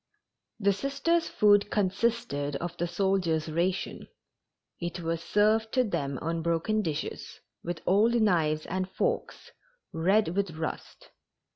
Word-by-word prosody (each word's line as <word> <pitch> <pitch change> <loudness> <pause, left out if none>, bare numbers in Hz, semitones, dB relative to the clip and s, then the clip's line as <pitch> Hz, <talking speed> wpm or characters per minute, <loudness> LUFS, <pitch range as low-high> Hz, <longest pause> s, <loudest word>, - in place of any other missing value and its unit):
The 200 -1 +3
Sisters' 280 - 0
food 205 -1 +4
consisted 200 - 0
of 175 +4 -4
the 175 - -1
soldiers' 175 -3 0
ration. 180 +4 -1 0.7
It 175 0 -4
was 165 0 -2
served 215 +4 +2
to 255 - +4
them 140 - -2
on 165 +1 -1
broken 170 +6 0
dishes, 160 -5 -4 0.2
with 170 -1 -5
old 215 +6 +4
knives 165 -9 +2
and 185 +1 -3
forks, 480 - -2 0.4
red 190 +5 +2
with 185 -2 -2
rust. 160 0 -6
185 Hz, 125 wpm, -28 LUFS, 165-215 Hz, 0.7 s, food